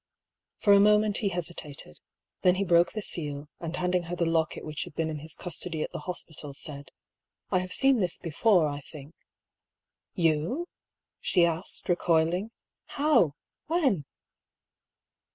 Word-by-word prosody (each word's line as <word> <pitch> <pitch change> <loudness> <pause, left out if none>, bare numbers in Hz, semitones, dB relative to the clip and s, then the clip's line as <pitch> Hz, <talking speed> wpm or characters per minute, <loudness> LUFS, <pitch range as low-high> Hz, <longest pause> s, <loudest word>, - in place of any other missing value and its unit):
For 205 - +5
a 200 - +7
moment 210 0 +4
he 205 - 0
hesitated; 160 - -6 0.4
then 180 0 +5
he 195 - 0
broke 170 -1 +4
the 215 - -4
seal, 145 -4 -4
and 165 0 -4
handing 180 -1 0
her 175 - -2
the 170 - 0
locket 165 -1 0
which 155 -1 -3
had 175 -5 -13
been 160 -1 -1
in 150 - -4
his 155 +2 -4
cus 175 -2 -4
tody 160 -3 -3
at - - -5
the - - -5
hospital, 155 -5 -5
said: 140 -1 -7 0.3
" - - -59
I 185 - +3
have 185 0 -5
seen 270 +2 +3
this 180 -4 0
before, 175 +1 +3
I 145 -1 -4
think." 145 +1 -12 0.6
" - - -63
You? 165 - 0 0.3
" - - -63
she 175 -3 +3
asked, 170 +2 -4
recoiling. 175 +2 +2 0.2
" - - -63
How? 285 - +4 0.3
When 275 - +1
170 Hz, 170 wpm, -28 LUFS, 155-195 Hz, 0.6 s, a